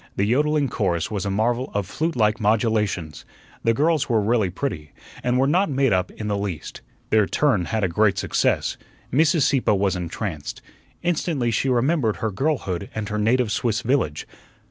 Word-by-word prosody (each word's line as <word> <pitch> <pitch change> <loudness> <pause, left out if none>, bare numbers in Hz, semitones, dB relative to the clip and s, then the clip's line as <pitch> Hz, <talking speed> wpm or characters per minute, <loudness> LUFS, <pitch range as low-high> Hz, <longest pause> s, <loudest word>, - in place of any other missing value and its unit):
The 100 - +1
yodling 145 +5 +2
chorus 95 -8 -1
was 100 -2 -2
a - - 0
marvel 120 +6 0
of 100 -1 0
flute 160 - -2
like 110 -1 +2
modulations. 105 -7 0 0.4
The 115 0 +2
girls 155 +1 +1
were 115 -2 +3
really 105 -2 +1
pretty, 90 - -4 0.3
and 125 0 +1
were 130 - +3
not 180 +7 +2
made 135 -4 +2
up 90 0 +1
in 105 - -7
the 100 -1 -1
least. 95 -6 -5 0.3
Their 110 -2 +4
"turn" 130 -12 +1
had 110 +2 -1
a - - +3
great 100 +3 +2
success. - - 0 0.4
Mrs. 155 +2 +4
Sieppe 130 -6 +2
was 100 -1 +1
entranced. 85 -2 -5 0.4
Instantly 160 -8 0
she 135 +4 0
remembered 125 -2 +2
her 110 - -2
girlhood 100 - -2
and 110 0 -3
her 105 0 -2
native 115 +1 +2
Swiss 110 0 0
village. 115 - -1
110 Hz, 175 wpm, -23 LUFS, 100-135 Hz, 0.4 s, Their